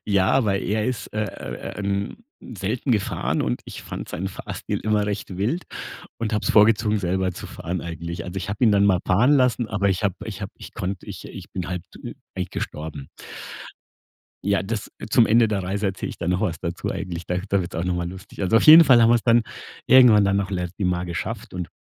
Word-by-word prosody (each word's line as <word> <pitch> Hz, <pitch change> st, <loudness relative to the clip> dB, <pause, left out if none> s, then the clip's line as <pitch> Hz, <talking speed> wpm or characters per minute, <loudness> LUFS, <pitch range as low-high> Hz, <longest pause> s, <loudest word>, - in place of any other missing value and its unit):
ja, 100 Hz, -3 st, +2 dB
aber 105 Hz, -7 st, +2 dB
er 105 Hz, +3 st, -1 dB
ist, 130 Hz, -2 st, -3 dB
äh, 105 Hz, -2 st, -5 dB
ähm, 100 Hz, -, -3 dB, 0.2 s
selten 115 Hz, +4 st, -2 dB
gefahren 105 Hz, -4 st, 0 dB
und -, -, -2 dB
ich -, -, -9 dB
fande -, -, -7 dB
seinen 95 Hz, +4 st, -3 dB
Fahrstil 95 Hz, -, -5 dB
immer 105 Hz, -1 st, +1 dB
recht 100 Hz, -2 st, -4 dB
wild 120 Hz, -, -1 dB, 0.5 s
und 115 Hz, -1 st, -2 dB
habe 105 Hz, -, 0 dB
es -, -, +1 dB
vorgezogen 105 Hz, 0 st, +4 dB
selber 95 Hz, 0 st, 0 dB
zu -, -, -8 dB
fahren 90 Hz, +1 st, -4 dB
eigentlich. 85 Hz, +1 st, -6 dB
Also 90 Hz, +1 st, -7 dB
ich 95 Hz, -, -4 dB
habe 105 Hz, +4 st, -4 dB
ihn 115 Hz, -, +6 dB
dann 100 Hz, 0 st, +4 dB
mal 95 Hz, -3 st, +3 dB
fahren 110 Hz, +9 st, +4 dB
lassen, 125 Hz, -4 st, +3 dB
aber 100 Hz, -2 st, +1 dB
ich 95 Hz, +1 st, 0 dB
habe 95 Hz, -3 st, +1 dB
ich 105 Hz, -2 st, -7 dB
habe 100 Hz, -1 st, -6 dB
ich -, -, -11 dB
konnte 95 Hz, -2 st, -4 dB
ich -, -, -8 dB
ich -, -, -10 dB
bin 90 Hz, -2 st, -4 dB
halb 90 Hz, -1 st, -3 dB
tü -, -, -9 dB, 0.2 s
eigentlich 90 Hz, -1 st, -3 dB
gestorben. 75 Hz, -3 st, -6 dB, 1.4 s
Ja, 100 Hz, -1 st, +2 dB
das 105 Hz, +1 st, -4 dB, 0.2 s
zum 115 Hz, 0 st, +5 dB
Ende 115 Hz, +1 st, +4 dB
der 100 Hz, -3 st, -1 dB
Reise 100 Hz, +3 st, -2 dB
erzähle 95 Hz, -1 st, -3 dB
ich -, -, -10 dB
dann 85 Hz, -, -1 dB
noch 90 Hz, +1 st, +1 dB
was 85 Hz, -2 st, -1 dB
dazu 85 Hz, 0 st, -3 dB
eigentlich. 90 Hz, -4 st, -5 dB
Da 90 Hz, -, -1 dB
da 100 Hz, 0 st, +2 dB
wird's 90 Hz, 0 st, -6 dB
auch 80 Hz, -, -2 dB
noch 90 Hz, 0 st, 0 dB
mal 85 Hz, -1 st, -2 dB
lustig. 95 Hz, +3 st, -9 dB
Also, 95 Hz, +4 st, +3 dB
auf -, -, +4 dB
jeden 160 Hz, +2 st, +10 dB
Fall 130 Hz, -5 st, +6 dB
haben 115 Hz, -, +5 dB
wir's 120 Hz, -1 st, +4 dB
dann 120 Hz, 0 st, +4 dB, 0.4 s
irgendwann 120 Hz, -5 st, +7 dB
dann 100 Hz, 0 st, +2 dB
noch 100 Hz, 0 st, -1 dB
Lloret 90 Hz, -2 st, -3 dB
de 100 Hz, -, 0 dB
Mar 90 Hz, 0 st, 0 dB
geschafft 85 Hz, +1 st, -5 dB
und, 90 Hz, -3 st, -4 dB
100 Hz, 225 wpm, -23 LUFS, 90-110 Hz, 1.4 s, jeden